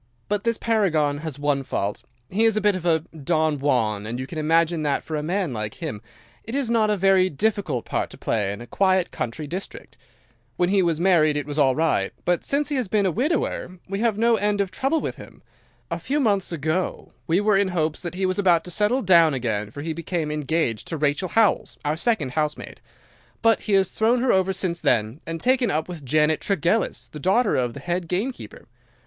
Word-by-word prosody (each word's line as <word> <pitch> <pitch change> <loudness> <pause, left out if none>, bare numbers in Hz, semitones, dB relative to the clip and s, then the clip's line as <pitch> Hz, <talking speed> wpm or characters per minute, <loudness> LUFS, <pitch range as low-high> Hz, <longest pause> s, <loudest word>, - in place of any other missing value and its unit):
"'But 205 +1 -1
this 230 -1 +1
paragon 160 -11 +1
has 155 -3 -6
one 145 -1 0
fault. 105 -6 -3 0.3
He 205 - 0
is 225 -2 +3
a - - +4
bit 205 -1 +2
of 175 -1 -3
a 160 -2 +3
Don 155 0 0
Juan, 110 -7 0
and 120 +2 -4
you 130 - -3
can 155 +3 -6
imagine 165 +1 +2
that 145 -2 0
for 155 - -5
a 150 - -1
man 175 -1 -1
like 105 -2 -4
him 105 -1 -5 0.4
it 225 - -6
is 270 -4 -1
not 220 -2 +3
a 210 - +1
very 190 -1 +4
difficult 190 - -1
part - - -2
to - - -12
play 105 -3 -1
in 100 - -7
a - - -8
quiet 190 +5 +1
country 135 +7 -4
district. 180 +7 -7 0.6
When 175 0 +2
he 195 0 +3
was 170 -3 +1
married 165 -5 +3
it 145 - -2
was 145 +1 -3
all 135 -3 +4
right, 155 -11 +1
but 175 -1 +1
since 290 +1 0
he 290 - -1
has 250 -5 -1
been 205 +1 +1
a 185 - +2
widower 245 - -1
we 195 +1 -3
have 230 -2 +1
had - - -7
no 230 0 +4
end 205 0 0
of 195 -2 0
trouble 270 - 0
with - - -4
him. - - -13 0.5
A - - -2
few 290 +2 -1
months 205 -9 +1
ago 160 +3 -2 0.2
we 165 +3 +3
were 210 0 +3
in 195 0 +3
hopes 160 -4 -1
that 175 -1 -5
he 190 +1 -1
was 185 +2 0
about 175 -4 +4
to 180 - -7
settle 215 +8 +1
down 170 -6 +5
again 110 -5 -2
for 145 +6 -8
he 160 0 -2
became 165 -1 -3
engaged 150 -6 -1
to 165 - -4
Rachel 150 +4 0
Howells, 225 -2 +2
our 150 +1 +1
second 220 - 0
housemaid; 150 +1 -3 0.6
but 225 -1 +4
he 210 - -3
has 195 -1 +3
thrown 230 +3 +2
her 255 - +3
over 190 0 +2
since 180 -3 -2
then 110 +6 +1
and 165 0 -4
taken 255 +1 +2
up 155 +1 -1
with 175 -5 -8
Janet 155 +3 +2
Tregellis, 200 +2 0
the 150 - -8
daughter 195 - +2
of 125 -2 -1
the - - -7
head 175 0 -3
gamekeeper. 190 - -4
175 Hz, 225 wpm, -23 LUFS, 150-205 Hz, 0.6 s, down